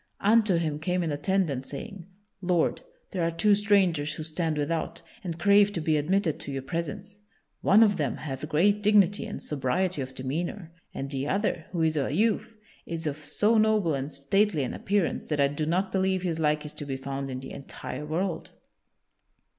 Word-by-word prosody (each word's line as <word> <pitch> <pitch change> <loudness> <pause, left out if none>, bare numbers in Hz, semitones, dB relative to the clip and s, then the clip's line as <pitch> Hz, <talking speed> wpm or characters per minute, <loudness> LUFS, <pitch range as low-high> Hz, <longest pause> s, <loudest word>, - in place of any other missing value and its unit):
Unto 215 -2 +4
him 155 -3 -1
came 180 +2 0
an 160 - -1
attendant, 145 -2 0
saying: 200 -6 -8 0.3
"Lord, 175 -3 +1 0.3
there 185 - -2
are 165 - +2
two 205 +5 +3
strangers 190 -7 +2
who 155 - -6
stand 160 0 -2
without, 165 +3 -2 0.2
and 170 -3 -4
crave 200 +3 +5
to 175 - -1
be 155 -1 +1
admitted 160 +2 +1
to - - -6
your 135 -1 -4
presence. 185 +8 -5 0.4
One 210 +4 +6
of 205 -2 +3
them 150 - -1
hath 140 0 -5
great 200 +7 +3
dignity 205 0 +4
and 210 - -6
sobriety 150 +4 -1
of 130 0 -6
demeanor, 165 +7 -4 0.2
and 135 - -4
the 135 0 -2
other, 195 -3 -1
who 170 -3 0
is 160 -1 +1
a 135 -2 0
youth, 220 +5 0 0.3
is 165 -1 -4
of 150 -1 -2
so 210 +9 +2
noble 215 -6 +3
and 135 +1 -3
stately 155 +4 +1
an 125 - -3
appearance 200 -3 -1
that 150 -2 -1
I 140 - +5
do 150 +2 -3
not 185 +4 0
believe 190 -1 +1
his 165 -3 -1
like 150 -1 +1
is 150 - -7
to 145 - -5
be 135 -1 -3
found 135 0 -4
in 130 -1 -4
the 135 - -9
entire 140 0 -7
world." 170 +4 -2
165 Hz, 190 wpm, -27 LUFS, 150-195 Hz, 0.4 s, One